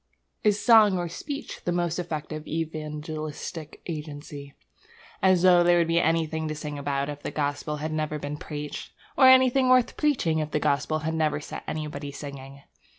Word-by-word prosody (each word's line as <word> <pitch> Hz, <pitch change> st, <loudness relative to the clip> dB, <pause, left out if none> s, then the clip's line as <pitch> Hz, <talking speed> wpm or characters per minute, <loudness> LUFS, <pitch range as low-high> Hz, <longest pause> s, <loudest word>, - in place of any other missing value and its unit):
Is 210 Hz, -1 st, +3 dB
song 215 Hz, -5 st, +6 dB
or 175 Hz, -1 st, -2 dB
speech 280 Hz, -, -7 dB
the 175 Hz, -, -1 dB
most 175 Hz, -1 st, -1 dB
effective 155 Hz, -2 st, -5 dB
evangelistic 155 Hz, 0 st, -5 dB
agency? 145 Hz, -3 st, -7 dB, 0.7 s
As 185 Hz, -2 st, +4 dB
though 180 Hz, -1 st, +7 dB
there 175 Hz, 0 st, +5 dB
would 170 Hz, -1 st, +2 dB
be 165 Hz, 0 st, +3 dB
anything 160 Hz, -1 st, 0 dB
to 155 Hz, -, -3 dB
sing 150 Hz, -1 st, -5 dB
about 140 Hz, -1 st, -1 dB
if 145 Hz, -1 st, -6 dB
the -, -, -4 dB
gospel 145 Hz, 0 st, -2 dB
had 155 Hz, +2 st, -4 dB
never 155 Hz, -1 st, -2 dB
been 145 Hz, 0 st, -5 dB
preached! 150 Hz, -1 st, -7 dB, 0.2 s
Or 260 Hz, -, +7 dB
anything 260 Hz, 0 st, +6 dB
worth 255 Hz, -1 st, +4 dB
preaching 250 Hz, -, +1 dB
if 155 Hz, -1 st, -2 dB
the 150 Hz, -, 0 dB
gospel 145 Hz, +1 st, +1 dB
had 160 Hz, -, -1 dB
never 155 Hz, -2 st, +1 dB
set 150 Hz, -, -7 dB
anybody 150 Hz, -2 st, -4 dB
singing! 140 Hz, -1 st, -9 dB
155 Hz, 170 wpm, -26 LUFS, 150-175 Hz, 0.7 s, though